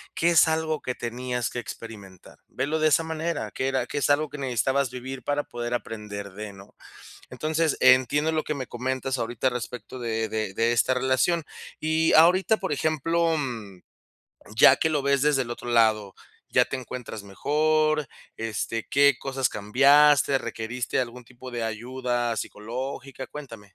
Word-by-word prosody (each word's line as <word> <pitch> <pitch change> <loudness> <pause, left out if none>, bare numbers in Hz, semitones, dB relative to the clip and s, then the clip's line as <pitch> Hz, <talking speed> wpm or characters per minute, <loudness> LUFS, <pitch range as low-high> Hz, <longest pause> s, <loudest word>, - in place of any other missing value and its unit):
que 170 +1 +2
es 165 - +6
algo 160 -1 -1
que 125 - -4
tenías 125 0 -3
que 120 - -5
experimentar. 100 -6 -10
Velo 150 +4 -2
de 155 0 +4
esa 165 - +3
manera, 160 +1 -3
que 130 - -2
era 135 -1 0
que 145 - -3
es 140 - 0
algo 150 +2 +3
que 145 +1 -9
necesitabas 130 +1 0
vivir 125 0 -7
para 145 0 -1
poder 120 0 -5
aprender 105 -4 -6
de, 105 0 -7
¿no? 95 +1 -15 0.6
Entonces, 155 +4 0
entiendo 130 +4 +4
lo 155 -1 -1
que 150 - -2
me 130 -2 -5
comentas 130 +1 -2
ahorita, 120 +2 -1
al 125 - -4
respecto 125 +2 -6
de 115 -2 -2
de 110 -3 -3
de 115 +1 +2
esta 120 +2 +2
relación. 130 +6 +1 0.4
Y, 160 +1 +2
ahorita, 185 +7 +5
por 190 - -3
ejemplo, 160 +3 +1
mm, 110 -10 -5 0.8
ya - - +8
que 160 - +1
lo 150 - +1
ves 140 -1 +2
desde 145 -3 +3
el 120 - -8
otro 120 0 -6
lado, 110 -4 +3 0.4
¿ya - - +4
te 135 - -4
encuentras 125 -4 -7
mejor, 155 +8 +1 0.3
este, 115 0 -3
qué 140 -1 +5
cosas 135 -1 -1
cambiaste, 140 +6 +4
requeriste 120 +1 -4
algún 125 0 -5
tipo 125 +1 -11
de 120 -1 -3
ayuda 120 +1 -2
psicológica? 130 +5 -6
Cuéntame. 115 -10 -10
130 Hz, 165 wpm, -25 LUFS, 115-150 Hz, 0.8 s, ya